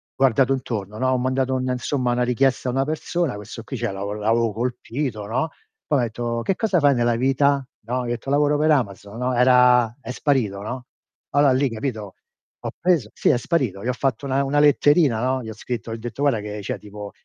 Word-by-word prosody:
guardato 135 0 +3
intorno, 110 -6 -4
no. 130 +3 +1
Ho 130 - +2
mandato 130 +1 0
un 130 0 -1
insomma 125 0 -1
una 125 0 +1
richiesta 125 +1 +1
a - - 0
una 135 +2 +1
persona, 155 -1 -2
questo 105 +2 -8
qui 130 +3 -6
c'è 115 -2 -2
lavo 100 +1 -4
l'avevo 110 +1 +1
colpito, 120 0 -3
no. 130 +9 -1 0.4
Poi 145 - +1
m'ha - - +2
detto: 115 +1 -3
"Che 195 - 0
cosa 205 -3 +1
fai 145 -2 +4
nella 120 -1 +2
vita?" 135 +2 +2 0.2
No? 125 +3 -2
Gli - - -5
ho - - -3
detto: 120 +3 -4
"Lavoro 145 +1 +3
per 155 +1 +3
Amazon." 105 -5 -1
No? 125 +1 -1
Era 125 -2 +5
è 125 - -6
sparito, 125 -8 0
no. 125 +4 -6 0.5
Allora 145 -1 +4
lì 130 +1 +2
capito? 110 -4 -5 0.5
Ho - - -2
preso 170 -11 +2
sì, - - +1
è - - +4
sparito. 120 - -1
Gli - - -4
ho - - +1
fatto 135 +1 -1
una 135 0 +1
una 145 +2 +1
letterina, 145 -4 +4
no, 130 +1 0
gli 110 - -7
ho - - -6
scritto 115 0 -5
gli - - -3
ho 115 - -9
detto: 120 +4 -6
"Guarda, 140 -6 +2
che 105 0 -6
c'è 100 - -4
tipo 105 0 -9
125 Hz, 225 wpm, -22 LUFS, 115-135 Hz, 0.5 s, Era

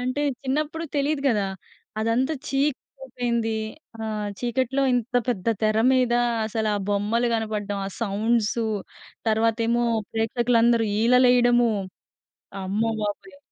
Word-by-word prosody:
అంటే, 255 +3 -1 0.2
చిన్నప్పుడు 305 +4 -2
తెలీదు 285 0 0
కదా. 210 -5 +1 0.5
అదంతా 245 +7 +1
చీకటయిపోయింది. 250 -4 -2 0.5
ఆహ్, 215 -1 -3
చీకట్లో 255 +2 0
ఇంత 245 +1 -1
పెద్ద 200 -7 -2 0.2
తెర 215 0 +2
మీద, 255 -2 +2 0.3
అసలా 220 -1 -1 0.2
బొమ్మలు 210 +4 +1
కనపడడం, 210 -2 -2
ఆ - - -3
సౌండ్సు, 225 +1 0 0.6
తర్వాతేమో 230 +2 +2 0.3
ప్రేక్షకులందరూ 230 0 +2
ఈలలేయడము, 245 0 +5 1.0
అమ్మబాబోయ్! 220 - -2
235 Hz, 95 wpm, -24 LUFS, 220-250 Hz, 1.0 s, ఈలలేయడము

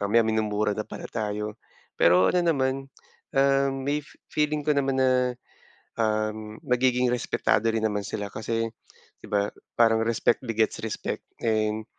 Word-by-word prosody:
mamaya, 110 +3 +4
minumura 110 -1 +1
na 110 - -2
pala - - -7
tayo. 105 0 -3 0.4
Pero 90 +2 +5
ano 180 - +3
naman, 135 -5 +1 0.5
um, 135 0 +4
may 145 +2 +1
fe - - -19
feeling 150 0 0
ko - - +3
naman 135 -1 +1
na, 130 - +4 0.9
um, 110 -1 -1
magiging 125 0 +2
respetado 115 -2 +1
rin 110 -1 -1
naman 105 -2 0
sila 105 -1 -4
kasi, 115 +1 -2 0.5
di - - -11
ba, 100 -1 +1 0.3
parang 115 -1 +5
respect 115 0 +2
begets 115 -2 0
respect. - - -4 0.2
And, 110 -1 0
115 Hz, 145 wpm, -26 LUFS, 105-130 Hz, 0.9 s, Pero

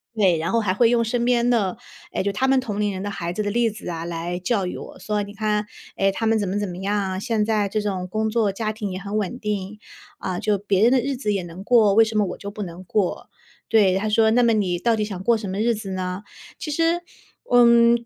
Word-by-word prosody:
对， 190 -6 +3
然 165 +2 -2
后 230 - +3
还 200 - 0
会 230 +3 +4
用 235 -1 +3
身 240 +1 0
边 245 0 +2
的， 205 -6 +1 0.4
哎， - - -1
就 200 - 0
他 260 +7 0
们 265 0 +4
同 210 -5 -4
龄 205 -1 +1
人 185 - -5
的 205 - -3
孩 175 -2 -4
子 210 - -2
的 205 - -1
例 235 +1 +2
子 210 - -8
啊， 165 -1 -4
来 170 +1 -3
教 195 -1 0
育 - - -5
我， - - -10
说： 210 +2 -1
“你 205 - -11
看， 210 0 -1 0.3
哎， 195 0 +2
他 225 +3 -2
们 225 0 +3
怎 200 - -1
么 205 +2 -1
怎 205 - -2
么 175 - -7
样 200 +2 -1
啊， 190 -2 -2
现 220 0 0
在 215 -2 +1
这 215 +1 -1
种 190 -3 -3
工 220 +3 -1
作 215 -2 +1
家 215 +2 -2
庭 210 -3 -4
也 185 - -4
很 200 +2 -3
稳 215 +4 -2
定， 210 -1 -4 0.4
嗯， 185 -1 -3
就 210 -1 +1
别 200 0 +1
人 240 - +6
的 265 - +4
日 275 +2 -2
子 210 -5 -1
也 195 - -1
能 175 +2 -9
过， 215 -3 +5
为 225 - +7
什 220 - -5
么 210 - +4
我 - - -5
就 200 - -7
不 210 0 -7
能 175 0 -8
过。” 195 0 -1 0.4
对， 195 -4 +4
他 215 - -1
说： 220 +1 +4
“那 245 +1 +4
么 230 -1 +4
你 185 -5 +1
到 230 +2 +2
底 215 - -1
想 190 -3 -6
过 235 +2 +4
什 205 -3 -5
么 195 +2 -3
日 235 +1 +2
子 210 -2 -7
呢？” 185 0 -3 0.4
其 310 - -5
实 330 +3 +1 0.5
嗯， 235 -1 +5
210 Hz, 290 characters per minute, -23 LUFS, 190-230 Hz, 0.5 s, 为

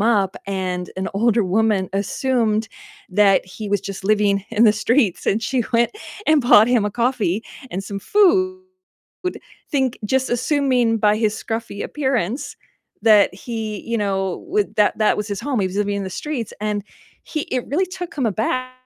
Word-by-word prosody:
up 205 -4 +2
and 185 -2 -3
an 190 - -2
older 225 +2 +2
woman 195 0 +1
assumed 220 +2 0 0.4
that 205 -2 +4
he 205 +3 -8
was 205 0 +2
just 195 0 -7
living 200 -1 +2
in 230 0 +3
the 215 - +6
streets, 215 -1 +1
and 220 +3 +1
she 250 +2 0
went 235 0 +3 0.4
and 310 -1 +5
bought 230 -4 +6
him 240 -4 +2
a - - -2
coffee 230 -4 0 0.3
and 195 +2 -4
some 200 0 -5
food, 370 - +2 1.1
think 265 -4 0
just 265 +3 0
assuming 250 -2 +2
by 210 -1 +3
his 215 -1 0
scruffy 225 -2 -4
appearance 265 -2 -2 0.5
that 210 -4 +5
he, 220 0 -5
you 230 0 -1
know, 195 - -2
w 410 +3 +2
that 210 -1 +3
that 215 -1 +3
was 210 +1 -3
his 200 -2 -3
home, 270 -6 -1
he 190 - +1
was 185 +1 -5
living 205 0 0
in 200 - -3
the 190 - -5
streets, 285 -8 -4
and 210 0 -2 0.4
he 310 - -3
it 250 -2 -1
really 350 +8 +1
took 360 -1 -7
him 275 - -1
aback 255 +4 -1
220 Hz, 175 wpm, -21 LUFS, 200-255 Hz, 1.1 s, the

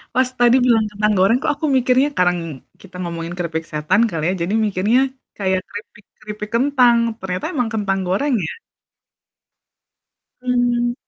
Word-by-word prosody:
Pas 255 0 +2
tadi 245 +1 +5
bilang 225 -3 +3
kentang 210 +1 +1
goreng 195 +6 +4
kok, - - +1
aku 310 - -4
mikirnya 255 +3 +3
kadang 180 -1 +3 0.4
kita 185 -2 -16
ngomongin 170 -1 -5
keripik 165 -2 -3
setan 155 +8 +1
kali 160 -4 -4
ya, - - +1
jadi 190 +5 -2
mikirnya 210 +5 +2 0.4
kayak 190 -2 0
keripik 210 0 -10 0.2
keripik 210 0 -7
kentang, 250 -2 +4 0.2
ternyata 185 -1 -4
emang 245 -5 -1
kentang 195 -3 -1
goreng 265 +10 0
ya? - - -5 1.9
Mmm. 240 -1 +1
210 Hz, 145 wpm, -19 LUFS, 185-245 Hz, 1.9 s, tadi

